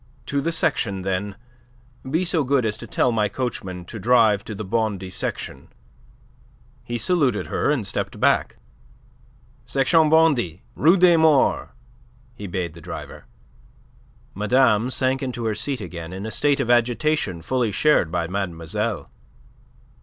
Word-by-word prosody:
"To 140 0 -1
the 165 - -1
section, 100 - -1
then. 95 +1 -2 0.7
Be 165 +6 0
so 165 -3 +1
good 135 -2 +1
as 105 -1 -1
to - - -9
tell 125 - +1
my 105 -3 +1
coachman 95 -7 -4
to 110 - -8
drive 110 -2 +3
to 105 - -6
the 105 +1 -6
Bondy 100 -3 -2
Section." - - -5 1.2
He 120 - -4
saluted 135 - +1
her - - -1
and 140 -8 0
stepped - - -3
back. - - +2 1.1
"Section 140 +6 +3
Bondy, 140 - +2
Rue 165 +6 +4
des 175 -2 +6
Morts," 160 -4 +3 0.6
he 105 -4 -8
bade 85 -2 -3
the 85 - -13
driver. 85 +1 -8 1.1
Madame 115 +2 +2
sank 130 0 0
into 125 -3 -4
her 110 - 0
seat 130 +5 -2
again, 85 0 -7
in 95 +3 -6
a 110 - -5
state 145 +2 +1
of 120 - +1
agitation 120 - +1
fully 125 0 0
shared 100 - +2
by 85 -1 -1
mademoiselle. 95 +3 -3
115 Hz, 145 wpm, -23 LUFS, 95-135 Hz, 1.2 s, des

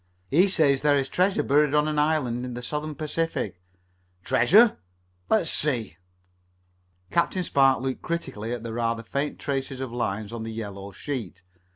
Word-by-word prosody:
"He 175 +8 +5
says 150 -8 +3
there 145 -1 +4
is 135 - 0
treasure 185 +2 +2
buried 150 +1 +3
on 150 0 +3
an 150 -1 0
island 145 -6 +1
in 125 -1 -5
the 125 - -6
Southern 150 +4 -4
Pacific." 145 - -3 0.6
"Treasure? 205 - +5 0.5
Let 220 - +4
me - - -5
see." 125 - 0 1.1
Captain 180 +2 +1
Spark 135 -5 +3
looked 130 -1 -3
critically 135 -10 -4
at 120 -2 -4
the 115 -1 -5
rather 115 0 -1
faint 140 +5 -3
tracing 135 -1 -3
of 130 -2 -4
lines 110 -2 -3
on 115 - -5
the 115 0 -5
yellow 100 -3 -6
sheet. 100 - -6
135 Hz, 165 wpm, -26 LUFS, 115-150 Hz, 1.1 s, He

